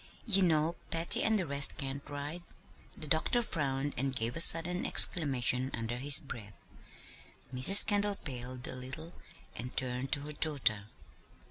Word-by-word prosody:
"You 195 -5 -1
know 165 -1 -1
Patty 165 +1 +2
and 220 0 0
the 185 - -4
rest 140 -2 +2
can't 135 -1 -7
ride." 145 +4 -8 0.6
The - - -10
doctor 160 - -1
frowned, 140 -6 -5
and 135 0 -3
gave 115 -1 -4
a 165 - -2
sudden 175 +2 +6
exclamation 130 -5 +1
under 115 +1 -7
his 140 +3 +7
breath. 110 -7 -13 0.9
Mrs. 130 +11 +6
Kendall 205 -1 -1
paled 125 -5 -9
a - - -8
little 135 +7 -9 0.4
and 125 +2 -10
turned 130 +1 -4
to 145 - -2
her 150 +1 -10
daughter. 135 -10 -1
140 Hz, 150 wpm, -29 LUFS, 130-165 Hz, 0.9 s, his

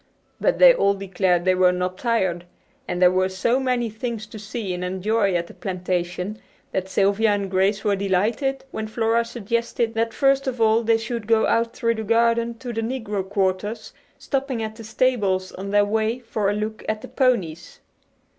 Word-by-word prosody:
But - - +2
they - - +8
all 200 - +2
declared 190 -2 0
they 185 - +4
were 185 0 +4
not 180 0 -3
tired, 190 -8 0 0.4
and 180 - -3
there 180 0 +6
were 185 0 +1
so 230 +7 +1
many 250 -3 0
things 225 0 -5
to 215 0 -10
see 210 -2 -4
and 180 0 -4
enjoy 195 +2 0
at 170 0 0
the - - -13
plantation 180 +1 -3 0.3
that 190 0 -2
Sylvia 200 +3 +2
and 200 -2 -2
Grace 195 +2 +1
were 205 -2 +2
delighted 215 +8 0
when 220 - -4
Flora 225 +1 +1
suggested 235 0 -2
that 230 0 0
first 275 +2 +2
of 250 -2 -2
all 225 0 +4
they 225 0 +3
should 230 -1 -5
go 225 -1 +4
out 230 0 +1
through 230 0 +1
the 220 -1 -4
garden 230 +1 +2
to 245 0 -6
the 225 - -2
negro 225 -4 -3
quarters, 205 +2 -1 0.2
stopping 265 -4 -2
at 220 0 -5
the 225 - -10
stables 210 -5 0
on 195 +1 -7
their 205 0 +4
way 220 +2 0
for 225 -4 -2
a - - +1
look 215 +1 -4
at 215 0 -2
the - - -7
ponies. 195 - -1
215 Hz, 190 wpm, -23 LUFS, 190-230 Hz, 0.4 s, they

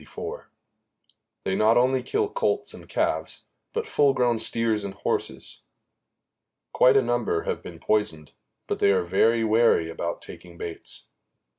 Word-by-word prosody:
They 95 - -1
not 110 +3 +4
only 130 +1 +3
kill 425 0 0
colts 425 -2 -1
and - - -13
calves, - - -1 0.3
but 455 0 -2
full 140 - +3
grown 120 -3 +2
steers 110 -2 0
and 100 -1 -6
horses. - - -3 1.1
Quite 130 +2 +5
a 135 - +4
number 120 -8 0
have - - -3
been - - -10
poisoned, 105 -9 -1 0.3
but - - -3
they 100 - +4
are 95 -2 +2
very 115 +6 +2
wary 110 -7 +3
about 85 +1 -4
taking 85 -1 -11
baits. 85 -1 -6
115 Hz, 140 wpm, -25 LUFS, 95-130 Hz, 1.1 s, Quite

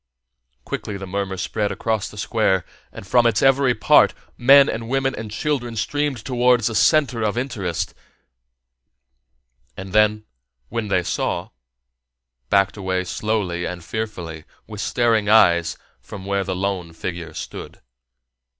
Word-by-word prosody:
Quickly 105 - -4
the 95 - -7
murmur 95 0 -3
spread 105 +2 -2
across 110 -3 -2
the 105 - -13
Square, 100 -4 +1 0.3
and - - -10
from 120 +4 +4
its 110 -2 +1
every 135 -2 +4
part - - +5 0.2
men 135 +3 +7
and 115 0 -4
women 135 0 0
and 110 -1 -6
children 120 0 -2
streamed 135 +2 -2
towards 125 -2 +3
the 115 - 0
center 125 0 +3
of 110 +1 -1
interest 105 -10 -3 1.8
and 95 0 -8
then, 105 0 +3 0.4
when 115 -2 -3
they 90 -3 +1
saw, - - -2 1.0
backed 100 +1 +2
away 95 -2 -1
slowly 95 -3 -2
and 90 -1 -6
fearfully, 90 -8 -5 0.2
with 105 -1 -7
staring 115 -3 +1
eyes, 85 -6 +4 0.2
from 95 - -10
where 100 0 0
the 95 -1 -3
lone 90 -3 -3
figure 85 -1 -6
stood. - - -8
105 Hz, 135 wpm, -21 LUFS, 95-120 Hz, 1.8 s, men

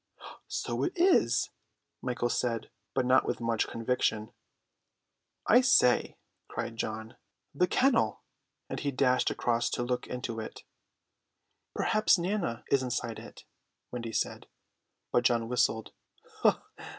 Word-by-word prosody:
"So - - -3
it 360 - 0
is," 360 +1 +3 0.5
Michael 120 -1 -1
said, 115 -2 -1 0.2
but 130 -2 +2
not 130 +1 +5
with - - -2
much 115 -1 0
conviction. 115 -2 -1 1.1
"I 245 +3 +6
say," 185 - +4 0.3
cried 115 - -4
John, 110 +1 -5 0.4
"the 180 +6 +2
kennel!" 265 +8 +2 0.4
and - - -4
he 145 - -1
dashed 130 -1 +2
across 120 0 0
to 120 - -2
look 125 0 -2
into 120 -2 -4
it. 110 - -7 1.1
"Perhaps 215 -2 +3
Nana 175 - -2
is 140 - +4
inside 125 -3 -3
it," - - -12 0.5
Wendy 115 -2 -5
said. - - -2 0.6
But 120 - +3
John 115 -2 +2
whistled. 115 -2 0
125 Hz, 120 wpm, -30 LUFS, 115-140 Hz, 1.1 s, I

